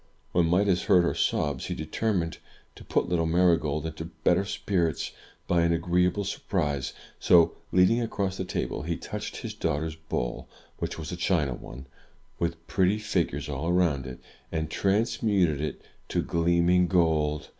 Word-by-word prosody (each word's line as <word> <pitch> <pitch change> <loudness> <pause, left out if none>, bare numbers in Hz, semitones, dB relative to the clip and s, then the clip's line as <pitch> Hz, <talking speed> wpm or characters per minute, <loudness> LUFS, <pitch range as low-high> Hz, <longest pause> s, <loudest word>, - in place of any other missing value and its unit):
When 85 -1 +3
Midas 90 +1 +2
heard 95 -4 +5
her 85 - +1
sobs, 70 -3 0
he - - -3
determined 85 +1 -1 0.3
to - - -13
put - - 0
little 85 -2 +1
Marygold 80 -3 +2
into 80 0 -5
better 90 +3 +1
spirits, 85 -6 -1 0.4
by 85 -1 +3
an 85 0 +3
agreeable 90 +4 +1
sur 100 - -4
prise; 70 -7 0 0.3
so, 85 -2 +5 0.2
leaning 90 +6 +4
across 100 -4 -2
the - - -2
table, 90 - -3
he 85 +1 -2
touched - - -6
his - - -5
daughter's 75 +2 -2
bowl 75 -6 -4 0.3
(which - - -3
was 80 0 -6
a - - -3
china 85 -6 +1
one, 65 +2 -10 0.5
with 85 -1 -2
pretty 95 +2 +2
figures 85 -9 -1
all 70 +3 -3
around 85 -7 +2
it), 65 - -8 0.3
and 80 -1 -2
transmuted 100 - +1
it 75 - -4 0.2
to - - 0
gleaming 85 +1 +3
gold. 80 -4 +1
85 Hz, 155 wpm, -27 LUFS, 80-90 Hz, 0.5 s, heard